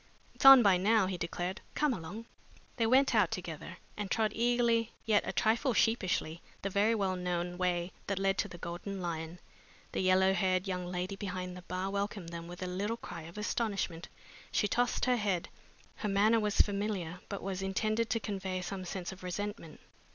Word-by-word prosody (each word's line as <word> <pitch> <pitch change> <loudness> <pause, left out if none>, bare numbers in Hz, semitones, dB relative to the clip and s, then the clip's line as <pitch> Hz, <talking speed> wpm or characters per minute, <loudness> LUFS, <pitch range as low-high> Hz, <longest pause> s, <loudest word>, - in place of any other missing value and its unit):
"It's - - -5
on 270 -2 +11
by 195 -3 +5
now," 210 +2 +3
he 185 0 -2
declared. 175 +2 -3
"Come 300 -3 +2
along." 200 +4 -7 0.5
They 230 -2 +2
went 260 +3 +4
out 210 -6 +4
together 170 -4 -6 0.2
and 205 -2 -4
trod 215 +1 +1
eagerly 235 -1 +2
yet 215 -2 +4
a - - 0
trifle 230 +3 +2
sheepishly 185 -8 +1 0.2
the 195 - -2
very 210 +4 +3
well 195 -3 0
known 180 -1 -2
way 180 -1 0 0.2
that 200 - -1
led 195 0 +1
to - - +1
the 175 - -10
Golden 175 +3 -5
Lion. 170 -1 -4 0.5
The - - -2
yellow 190 +1 +4
haired 185 0 +1
young 180 -1 -2
lady 180 +2 -3
behind 185 -2 -5
the 180 - -9
bar 185 +2 -3
welcomed 200 -3 -3
them 170 0 -7
with 175 +1 -7
a - - -2
little 200 +5 -2
cry 165 - -8
of 170 - -13
astonishment. 205 -6 -2 0.4
She 210 - +2
tossed 245 +3 +1
her 250 -1 +3
head. 195 -5 -1 0.5
Her 210 - -2
manner 210 +3 +4
was 210 -1 +3
familiar 200 -4 -1
but 200 - -5
was 190 0 -3
intended 215 +4 0
to 230 - +1
convey 190 -3 -3
some 185 +1 -5
sense 180 0 -4
of 190 - -11
resentment. 185 -2 -5
195 Hz, 190 wpm, -32 LUFS, 180-215 Hz, 0.5 s, on